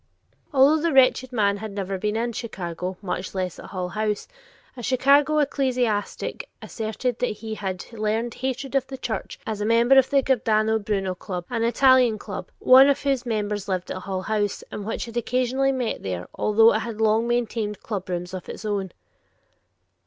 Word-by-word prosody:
Although 290 Hz, +2 st, +5 dB
the 335 Hz, 0 st, +1 dB
wretched 260 Hz, -1 st, +4 dB
man 205 Hz, -4 st, +1 dB
had 215 Hz, +1 st, -6 dB
never 195 Hz, -1 st, -3 dB
been 210 Hz, +2 st, -1 dB
in 235 Hz, +1 st, -1 dB
Chicago, 185 Hz, -5 st, -5 dB
much 185 Hz, 0 st, -4 dB
less 185 Hz, -2 st, -3 dB
at -, -, -9 dB
Hull 180 Hz, -2 st, -4 dB
House, 210 Hz, +2 st, -2 dB, 0.5 s
a 245 Hz, -, -8 dB
Chicago 280 Hz, +5 st, +3 dB
ecclesiastic 255 Hz, -7 st, -1 dB
asserted 225 Hz, +2 st, -3 dB
that 250 Hz, -, +1 dB, 0.2 s
he 220 Hz, -1 st, -4 dB
had 190 Hz, -3 st, -4 dB
learned 225 Hz, +2 st, -1 dB
hatred 260 Hz, +1 st, -4 dB
of 275 Hz, -2 st, +1 dB
the 265 Hz, -, -7 dB
Church 235 Hz, -3 st, -5 dB
as 215 Hz, -2 st, -4 dB
a -, -, 0 dB
member 235 Hz, +4 st, +5 dB
of 265 Hz, -, +1 dB
the 275 Hz, -1 st, +3 dB
Giordano 220 Hz, -4 st, +2 dB
Bruno 200 Hz, -3 st, -1 dB
Club, 180 Hz, -1 st, -6 dB
an 230 Hz, -2 st, -1 dB
Italian 250 Hz, -1 st, +4 dB
Club, 200 Hz, -2 st, -7 dB
one 265 Hz, +2 st, +7 dB
of 280 Hz, -, +1 dB
whose 270 Hz, -3 st, 0 dB
members 210 Hz, -2 st, -2 dB
lived 185 Hz, -2 st, -2 dB
at -, -, -3 dB
Hull 185 Hz, 0 st, -4 dB
House, 205 Hz, -1 st, -1 dB
and 205 Hz, -, -6 dB
which 225 Hz, -, -3 dB
had 230 Hz, 0 st, -7 dB
occasionally 255 Hz, +3 st, +1 dB
met 255 Hz, -4 st, -2 dB
there, 90 Hz, -2 st, -4 dB
although 225 Hz, +2 st, +4 dB
it -, -, +1 dB
had 230 Hz, -2 st, -6 dB
long 220 Hz, +1 st, +2 dB
maintained 230 Hz, -3 st, -1 dB
clubrooms 180 Hz, -4 st, -4 dB
of 185 Hz, -, -7 dB
its -, -, -7 dB
own. 200 Hz, -3 st, -2 dB
220 Hz, 180 wpm, -24 LUFS, 200-255 Hz, 0.5 s, one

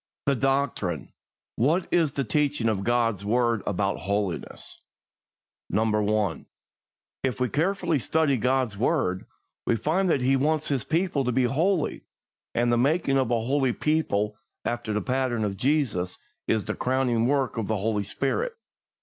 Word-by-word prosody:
I. 140 Hz, -, +3 dB
The 125 Hz, -, -3 dB
Doctrine. 135 Hz, -, -1 dB, 0.4 s
What 160 Hz, +9 st, +2 dB
is 160 Hz, -5 st, +3 dB
the 140 Hz, -, -1 dB
teaching 140 Hz, +1 st, +1 dB
of 100 Hz, -3 st, -1 dB
God's 115 Hz, -3 st, +1 dB
word 115 Hz, +1 st, +1 dB
about 100 Hz, 0 st, 0 dB
holiness? 100 Hz, -2 st, -3 dB, 0.9 s
1. 105 Hz, -2 st, +1 dB, 0.8 s
If 130 Hz, -2 st, -1 dB
we 125 Hz, -1 st, +1 dB
carefully 170 Hz, -1 st, +1 dB
study 155 Hz, +1 st, +2 dB
God's 125 Hz, -2 st, +1 dB
word, 100 Hz, -, 0 dB, 0.4 s
we -, -, +3 dB
find 160 Hz, -, +1 dB
that 140 Hz, -, +2 dB
He 130 Hz, +2 st, +3 dB
wants 155 Hz, +3 st, +1 dB
His 135 Hz, -4 st, 0 dB
people 165 Hz, -3 st, +1 dB
to 125 Hz, -, +1 dB
be 130 Hz, +2 st, +2 dB
holy, 160 Hz, +7 st, +1 dB, 0.5 s
and 120 Hz, 0 st, +2 dB
the 120 Hz, -, +3 dB
making 135 Hz, 0 st, +2 dB
of 130 Hz, -3 st, 0 dB
a 120 Hz, -1 st, +1 dB
holy 130 Hz, +1 st, +1 dB
people, 105 Hz, -10 st, 0 dB, 0.3 s
after 120 Hz, -2 st, -2 dB
the 105 Hz, 0 st, 0 dB
pattern 125 Hz, -4 st, 0 dB
of 100 Hz, -2 st, -2 dB
Jesus, 120 Hz, -8 st, 0 dB, 0.3 s
is 110 Hz, -2 st, +1 dB
the -, -, -2 dB
crowning 125 Hz, -3 st, +1 dB
work 135 Hz, -4 st, +1 dB
of 105 Hz, -, -2 dB
the 110 Hz, -, 0 dB
Holy 105 Hz, 0 st, 0 dB
Spirit. 135 Hz, -, -1 dB
125 Hz, 155 wpm, -26 LUFS, 110-145 Hz, 0.9 s, I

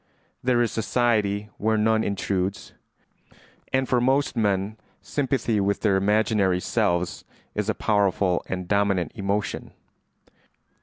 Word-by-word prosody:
"There 120 Hz, -1 st, +2 dB
is 115 Hz, -, -1 dB
society 105 Hz, -1 st, 0 dB
where 110 Hz, +1 st, +1 dB
none 110 Hz, +1 st, +2 dB
intrudes;" 95 Hz, -1 st, -2 dB, 1.0 s
and 130 Hz, 0 st, +1 dB
for 125 Hz, -1 st, +2 dB
most 135 Hz, +3 st, +2 dB
men 105 Hz, -1 st, 0 dB, 0.2 s
sympathy 125 Hz, -6 st, -1 dB
with 100 Hz, 0 st, 0 dB
their 105 Hz, -3 st, +3 dB
imaginary 100 Hz, -1 st, +2 dB
selves 85 Hz, -1 st, 0 dB, 0.3 s
is 105 Hz, 0 st, -2 dB
a 110 Hz, -, +1 dB
powerful 100 Hz, -3 st, +1 dB
and 90 Hz, -1 st, -3 dB
dominant 100 Hz, -4 st, +1 dB
emotion. 100 Hz, +1 st, -3 dB
105 Hz, 115 wpm, -25 LUFS, 95-110 Hz, 1.0 s, their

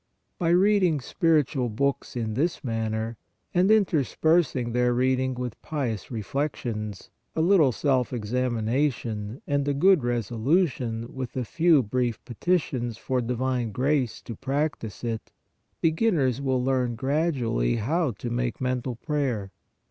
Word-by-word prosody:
By 170 Hz, -, +1 dB
reading 185 Hz, -3 st, +4 dB
spiritual 145 Hz, -4 st, +1 dB
books 140 Hz, +6 st, -1 dB
in 115 Hz, -3 st, -2 dB
this 160 Hz, +9 st, -1 dB
manner, 110 Hz, -1 st, -2 dB, 0.4 s
and 185 Hz, +2 st, +3 dB
interspersing 160 Hz, -, +2 dB
their 125 Hz, 0 st, +2 dB
reading 130 Hz, +1 st, +1 dB
with 125 Hz, -2 st, -5 dB
pious 130 Hz, -, -3 dB
reflections, 110 Hz, -3 st, -4 dB, 0.2 s
a 160 Hz, -, +1 dB
little 165 Hz, -6 st, +5 dB
self 130 Hz, 0 st, +1 dB
examination 120 Hz, -1 st, -1 dB
and 145 Hz, -1 st, 0 dB
a 145 Hz, -, +1 dB
good 185 Hz, +5 st, +5 dB
reso 120 Hz, -3 st, -2 dB
lution 125 Hz, -7 st, +1 dB
with 130 Hz, -1 st, -6 dB
a 125 Hz, -, -1 dB
few 165 Hz, 0 st, +4 dB
brief 120 Hz, 0 st, -1 dB
petitions 125 Hz, -4 st, -1 dB
for 130 Hz, +1 st, -1 dB
divine 125 Hz, -1 st, -1 dB
grace 130 Hz, 0 st, 0 dB
to 115 Hz, -, -6 dB
practise 135 Hz, -5 st, -3 dB
it, 115 Hz, -2 st, -4 dB, 0.5 s
beginners 160 Hz, -, +2 dB
will 130 Hz, -2 st, 0 dB
learn 125 Hz, -2 st, +1 dB
gradually 130 Hz, -, 0 dB
how 150 Hz, +8 st, 0 dB
to 120 Hz, +2 st, -5 dB
make 120 Hz, 0 st, -1 dB
mental 125 Hz, -1 st, -1 dB
prayer. 125 Hz, -, -2 dB
130 Hz, 130 wpm, -26 LUFS, 115-150 Hz, 0.5 s, little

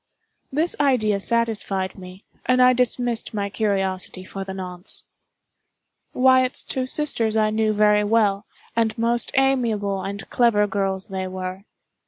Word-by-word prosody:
This 315 Hz, +5 st, 0 dB
idea 230 Hz, -8 st, +2 dB
satisfied 210 Hz, -4 st, -1 dB
me, 185 Hz, +1 st, -12 dB, 0.2 s
and 255 Hz, 0 st, +3 dB
I 250 Hz, 0 st, +6 dB
dismissed 245 Hz, -2 st, 0 dB
my 200 Hz, -1 st, -2 dB
curiosity 195 Hz, -3 st, -2 dB
for 195 Hz, +1 st, -6 dB
the 190 Hz, -, -7 dB
nonce. 185 Hz, 0 st, -1 dB, 1.1 s
Wyatt's 255 Hz, 0 st, +3 dB
two 260 Hz, -1 st, -1 dB
sisters 235 Hz, -7 st, +1 dB
I 215 Hz, 0 st, +2 dB
knew 215 Hz, 0 st, +1 dB
very 210 Hz, 0 st, +3 dB
well, 205 Hz, -1 st, +1 dB, 0.3 s
and 225 Hz, -1 st, 0 dB
most 235 Hz, +1 st, +1 dB
amiable 230 Hz, -8 st, +1 dB
and 195 Hz, +1 st, -6 dB
clever 230 Hz, -4 st, +3 dB
girls 195 Hz, -1 st, -2 dB
they 190 Hz, -1 st, -4 dB
were. 185 Hz, +1 st, -6 dB
215 Hz, 135 wpm, -22 LUFS, 195-240 Hz, 1.1 s, I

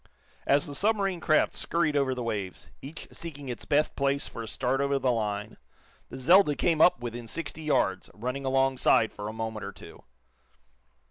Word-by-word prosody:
As 140 Hz, +1 st, +4 dB
the 145 Hz, -, -5 dB
submarine 195 Hz, +1 st, +1 dB
craft 155 Hz, -2 st, +2 dB
scurried 155 Hz, -3 st, 0 dB
over 135 Hz, -2 st, +1 dB
the 125 Hz, -, -4 dB
waves, 100 Hz, -7 st, -4 dB
each 145 Hz, +4 st, -8 dB
seeking 145 Hz, -5 st, -8 dB
its 120 Hz, -, -6 dB
best 150 Hz, +1 st, +1 dB
place 140 Hz, 0 st, 0 dB
for 115 Hz, -, -7 dB
a 115 Hz, -, -6 dB
start 130 Hz, +4 st, -1 dB
over 140 Hz, 0 st, +1 dB
the 130 Hz, -2 st, +1 dB
line, 105 Hz, -2 st, -3 dB, 0.5 s
the -, -, -8 dB
"Zelda" 150 Hz, +3 st, +5 dB
came 160 Hz, 0 st, +1 dB
up 170 Hz, -9 st, +5 dB
within 120 Hz, -1 st, -6 dB
sixty 160 Hz, +4 st, -3 dB
yards, 95 Hz, -11 st, 0 dB
running 125 Hz, +6 st, -4 dB
alongside 135 Hz, -4 st, +3 dB
for 105 Hz, -, -6 dB
a -, -, -4 dB
moment 110 Hz, -1 st, -4 dB
or -, -, -5 dB
two. -, -, -13 dB
135 Hz, 180 wpm, -28 LUFS, 115-150 Hz, 0.5 s, Zelda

